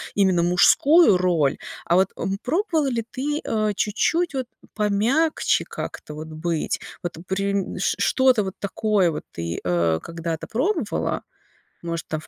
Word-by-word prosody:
именно 190 -4 +3
мужскую 215 - +5
роль, 170 -6 +1 0.3
а 170 - +2
вот, 190 +1 +4
м, 195 +1 -2
пробовала 325 - +1
ли 235 -4 -1
ты, 295 +3 -2
э, 215 -1 0
чуть-чуть 325 - 0
вот 260 -2 -3 0.3
помягче 220 +10 +1
как-то 150 - -7
вот 155 +1 -7
быть? 160 +1 -2 0.2
Вот 175 - -3
при 195 0 -1
ш - - +1
что-то 260 -5 +3
вот 190 -1 -5
такое 200 -3 +1
вот 150 - -5
ты, 85 0 -4
э, 85 -2 +1
когда-то 165 -1 -5
пробовала? 300 - -1 0.6
Может, 170 -1 -4
там 155 - -3
в 155 - -15
195 Hz, 145 wpm, -23 LUFS, 170-255 Hz, 0.6 s, мужскую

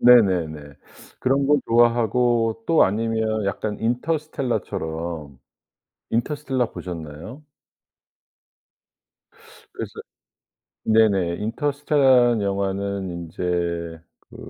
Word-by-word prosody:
네네네. 85 - +4 0.4
그런 135 +2 +1
거 145 0 +4
좋아하고 120 -1 +2
또 165 - +5
아니면 110 +1 -1
약간 105 +1 -3
인터스텔라처럼 110 - -3 0.7
인터스텔라 130 0 -1
보셨나요? 85 - -8 2.3
그래서 - - -6 0.9
네네 100 -6 +3
인터스텔라 130 - +2
영화는 100 -1 -2
인제 85 -1 -3 0.3
그 - - -12
110 Hz, 200 characters per minute, -23 LUFS, 90-125 Hz, 2.3 s, 또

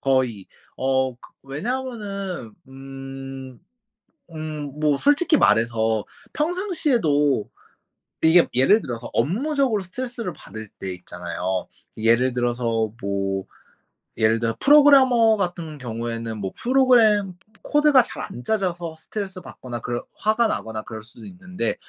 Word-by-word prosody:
거의. 130 -7 0 0.3
어. 130 0 +1
그 120 - -31 0.3
왜냐하면은 200 - -4 0.2
음, 135 -1 -9 0.7
음 150 -2 -6
뭐 150 -2 +3
솔직히 295 - +3
말해서 110 - +2 0.3
평상시에도 265 - +1 0.7
이게 165 +2 +6
예를 135 - +5
들어서 120 -1 -6
업무적으로 250 - +1
스트레스를 230 0 -5
받을 110 -1 -10
때 95 -1 -4
있잖아요. 90 +1 -4 0.3
예를 115 +3 +3
들어서 120 -3 0
뭐 100 -1 -1 0.7
예를 110 +1 +3
들어 115 -1 -1
프로그래머 260 -6 +6
같은 175 -5 -3
경우에는 115 -2 -4
뭐 95 -2 -3
프로그램 235 -7 +4 0.3
코드가 295 -4 +5
잘 - - -7
안 120 - -8
짜져서 175 - -2
스트레스 190 +2 -6
받거나 120 -2 -8
그럴 120 +1 -4
화가 220 +2 +2
나거나 110 - -3
그럴 110 -2 -8
수는 110 - -13
있는데 185 -9 -4
145 Hz, 280 characters per minute, -23 LUFS, -, 0.7 s, 이게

